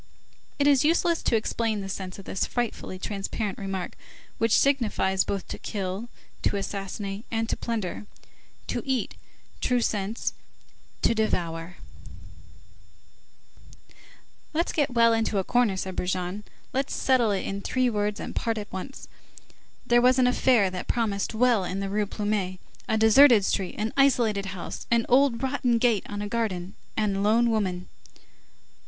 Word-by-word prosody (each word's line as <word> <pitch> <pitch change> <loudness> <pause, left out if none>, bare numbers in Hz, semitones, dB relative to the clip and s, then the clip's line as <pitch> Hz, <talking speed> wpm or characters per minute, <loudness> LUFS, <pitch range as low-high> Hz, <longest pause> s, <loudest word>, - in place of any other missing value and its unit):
It 285 - +2
is 280 -3 +5
useless 335 +2 +2
to - - +1
explain 220 -1 -1
the 195 - -5
sense 185 -1 -5
of 195 - -11
this 190 - -1
frightfully 240 -5 -3
transparent 200 +1 -4
remark, 195 -2 -4 0.5
which 225 -1 +4
signifies 220 -8 +2
both 195 -2 -3
to - - -6
kill, 195 +3 -4 0.3
to 205 - +1
assassinate, 195 +1 -4
and 225 0 -1
to - - +1
plunder. 215 -3 -4 0.6
To - - -1
eat, 265 -2 -1 0.5
true 250 -1 +2
sense: 210 -1 -1 0.7
to - - +4
devour. 175 -6 -2 2.8
"Let's 335 +3 +1
get 290 -3 +1
well 230 0 +5
into 225 -2 0
a 190 - +1
corner," 240 -3 +2
said 190 0 -4
Brujon. 180 +3 -2 0.3
"Let's 270 +1 -1
settle 255 -4 +3
it 200 -2 -1
in 200 0 -3
three 255 +4 +1
words, 210 -2 -1
and - - -6
part 225 -1 -1
at 205 -1 -7
once. 190 +9 -7 0.8
There 240 0 +4
was 250 +1 +5
an 255 - +4
affair 245 -5 +3
that 180 -1 -5
promised 220 -2 -1
well 235 -3 +3
in 185 +2 -3
the 195 0 -3
Rue 210 0 0
Plumet, 205 -3 -2 0.3
a 220 - +2
deserted 220 0 +7
street, 190 -2 -1
an 215 +1 -2
isolated 235 -8 +3
house, 185 -2 -6
an 235 -1 +3
old 255 -1 +3
rotten 260 -3 +1
gate 230 -4 +2
on 205 0 -4
a - - -3
garden, 205 -5 -2 0.2
and 200 -2 0
lone 230 +3 +3
women." 185 -5 -1
215 Hz, 150 wpm, -26 LUFS, 195-240 Hz, 2.8 s, deserted